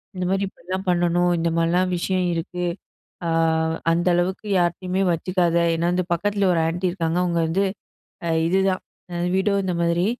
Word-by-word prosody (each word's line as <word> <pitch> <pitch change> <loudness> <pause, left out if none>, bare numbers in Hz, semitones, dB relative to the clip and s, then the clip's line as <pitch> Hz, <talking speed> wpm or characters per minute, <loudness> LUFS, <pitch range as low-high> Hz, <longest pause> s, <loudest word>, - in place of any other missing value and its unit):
இந்தமாரி 185 +2 0
இப்பிடிதான் 185 +1 -6
பண்ணணும். 175 0 +2
இந்த 170 0 +1
மாரிலாம் 175 +2 +2
விஷயம் 185 +1 0
இருக்கு. 175 +1 -3 0.6
அ - - 0 0.6
அந்த 170 +2 +1
அளவுக்கு 185 +4 -1
யார்ட்டயுமே 180 +2 0
வச்சுக்காத! 175 0 0 0.2
ஏன்னா 170 +1 0
இந்த 185 - +1
பக்கத்தில 200 +3 0
ஒரு 165 - +2
ஆன்ட்டி 175 +3 -1
இருக்காங்க. 170 -2 -1
அவுங்க 170 -1 0
வந்து 180 +5 +1 0.6
அ - - -1 0.2
இதுதான் 190 +1 +1 0.5
வீடோ 200 +1 +2
இந்த 185 - -1
மாதிரி 170 +1 +2
180 Hz, 145 wpm, -23 LUFS, 170-185 Hz, 0.6 s, பண்ணணும்